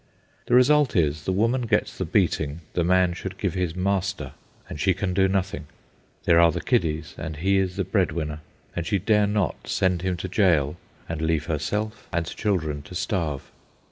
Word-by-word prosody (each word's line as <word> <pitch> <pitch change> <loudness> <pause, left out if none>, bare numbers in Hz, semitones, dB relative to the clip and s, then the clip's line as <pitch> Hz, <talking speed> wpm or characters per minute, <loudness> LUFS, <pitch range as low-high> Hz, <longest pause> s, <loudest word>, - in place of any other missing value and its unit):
The 120 - +3
result 140 +1 +5
is, 75 -4 +1
the - - +1
woman 115 +6 +1
gets - - +1
the - - -3
beating 75 +2 0
the 85 - +1
man 90 0 +3
should 95 +2 -6
give 95 -4 -1
his 90 -3 -2
master, 95 0 -1 0.4
and 75 - -7
she 95 +2 +2
can 95 -1 -2
do 95 +1 +3
nothing. 95 -6 -2 0.6
There 85 -1 +5
are 85 -1 +6
the 85 - -3
kiddies, 85 -11 0
and 80 +1 -4
he 95 +5 +2
is 95 -2 -1
the 95 - 0
bread 95 -1 +1
winner, 75 -2 -3 0.4
and 85 - -1
she 100 - +2
dare 105 +2 +3
not 105 -4 -1
send 90 -2 +1
him 95 -1 -1
to 90 - -4
jail 85 -7 +2 0.3
and 80 -1 -4
leave 80 -1 0
herself 105 +8 -3
and 85 -1 0
children 80 -6 -1
to 90 - -11
starve. 85 - -2
90 Hz, 190 wpm, -25 LUFS, 80-100 Hz, 0.6 s, are